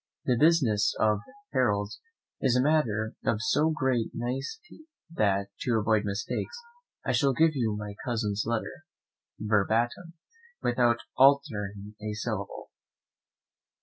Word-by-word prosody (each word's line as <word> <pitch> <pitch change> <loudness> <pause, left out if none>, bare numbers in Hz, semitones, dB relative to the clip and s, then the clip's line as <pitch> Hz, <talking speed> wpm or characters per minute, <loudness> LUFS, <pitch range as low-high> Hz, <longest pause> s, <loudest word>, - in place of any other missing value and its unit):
The 125 - +3
business 140 -11 +3
of 105 -1 +3 0.3
heralds 105 -6 0 0.4
is 130 -3 +3
a 125 - +3
matter 115 -8 +1
of 105 - +1
so 145 +8 +2
great 130 -7 0
nicety 135 - -5 0.3
that, 100 -6 +1
to 120 -3 +1
avoid 110 0 +2
mistakes, 105 - -3 0.5
I - - +1
shall 140 -2 +3
give 160 +4 +4
you 115 -6 -1
my 105 -1 -6
cousin's 110 -5 -1
letter, 115 0 -3 0.6
verbatim, 115 - 0 0.5
without 120 -1 +3 0.2
altering 105 -7 +2
a 105 0 -3
syllable. 105 -2 -5
115 Hz, 115 wpm, -28 LUFS, 105-135 Hz, 0.6 s, give